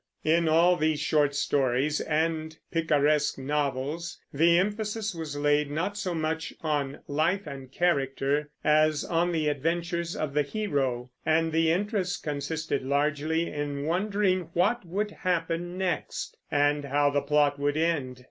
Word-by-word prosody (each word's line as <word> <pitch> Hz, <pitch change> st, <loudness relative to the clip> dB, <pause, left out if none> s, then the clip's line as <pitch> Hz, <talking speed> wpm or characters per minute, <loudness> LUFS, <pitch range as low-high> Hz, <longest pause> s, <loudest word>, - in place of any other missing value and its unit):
In 165 Hz, +1 st, +3 dB
all 170 Hz, +3 st, +5 dB
these 155 Hz, -1 st, +1 dB
short 145 Hz, -1 st, +2 dB
stories 140 Hz, +1 st, +1 dB
and 160 Hz, 0 st, -1 dB
picaresque 150 Hz, -2 st, +2 dB
novels 145 Hz, +3 st, -2 dB
the 170 Hz, +4 st, +4 dB
emphasis 210 Hz, +2 st, -1 dB
was 160 Hz, -4 st, -5 dB
laid 145 Hz, 0 st, +2 dB
not 170 Hz, +8 st, -2 dB
so 185 Hz, -4 st, -2 dB
much 160 Hz, 0 st, -2 dB
on 145 Hz, -3 st, -1 dB
life 165 Hz, +7 st, 0 dB
and 135 Hz, -3 st, -8 dB
character 145 Hz, -2 st, 0 dB
as 155 Hz, 0 st, +3 dB
on 175 Hz, +1 st, +1 dB
the 160 Hz, -3 st, 0 dB
adventures 170 Hz, +4 st, -1 dB
of 150 Hz, -3 st, -3 dB
the 150 Hz, -, +3 dB
hero; 140 Hz, -, -2 dB
and 160 Hz, +1 st, +2 dB
the 160 Hz, 0 st, +2 dB
interest 190 Hz, 0 st, -1 dB
consisted 150 Hz, +2 st, -2 dB
largely 150 Hz, +4 st, 0 dB
in 145 Hz, -1 st, -3 dB
wondering 185 Hz, 0 st, 0 dB
what 205 Hz, +7 st, +2 dB
would 205 Hz, +5 st, -2 dB
happen 175 Hz, -1 st, -2 dB
next, 185 Hz, -2 st, -2 dB
and 145 Hz, -1 st, +2 dB
how 145 Hz, +1 st, +2 dB
the 145 Hz, 0 st, +1 dB
plot 145 Hz, 0 st, +2 dB
would 145 Hz, +1 st, 0 dB
end. 145 Hz, -6 st, 0 dB
155 Hz, 140 wpm, -27 LUFS, 145-170 Hz, -, all